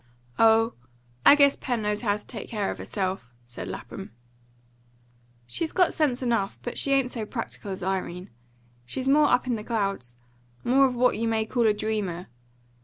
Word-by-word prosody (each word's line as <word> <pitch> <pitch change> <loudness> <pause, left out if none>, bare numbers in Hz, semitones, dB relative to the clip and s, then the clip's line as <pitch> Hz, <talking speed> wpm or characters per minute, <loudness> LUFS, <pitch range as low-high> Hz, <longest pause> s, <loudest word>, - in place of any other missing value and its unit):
"Oh, 225 +1 +5 0.5
I - - +10
guess 280 -1 +5
Pen'll 245 -4 -2
know 210 0 +1
how 205 -3 +1
to 210 - -15
take 220 -5 -8
care 210 -4 -1
of - - -7
herself," 185 - -4
said 120 0 -8
Lapham. - - -8 1.3
"She's 315 - -3
got 365 -2 +3
sense 270 -5 0
enough. 230 -5 0
But 240 - -4
she 275 - 0
ain't 270 -2 +2
so 230 - -4
practical 225 -2 -6
as 190 -2 -5
Irene. 185 -2 -3 0.5
She's 255 - -4
more 295 +2 +5
up 250 - +3
in 245 -3 0
the 210 - -7
clouds 195 - -2 0.5
more 270 +3 +5
of 250 - -4
what 250 -2 +2
you 230 - 0
may 220 -1 +1
call 235 0 +1
a - - +5
dreamer. 205 -5 -3
225 Hz, 180 wpm, -26 LUFS, 195-250 Hz, 1.3 s, I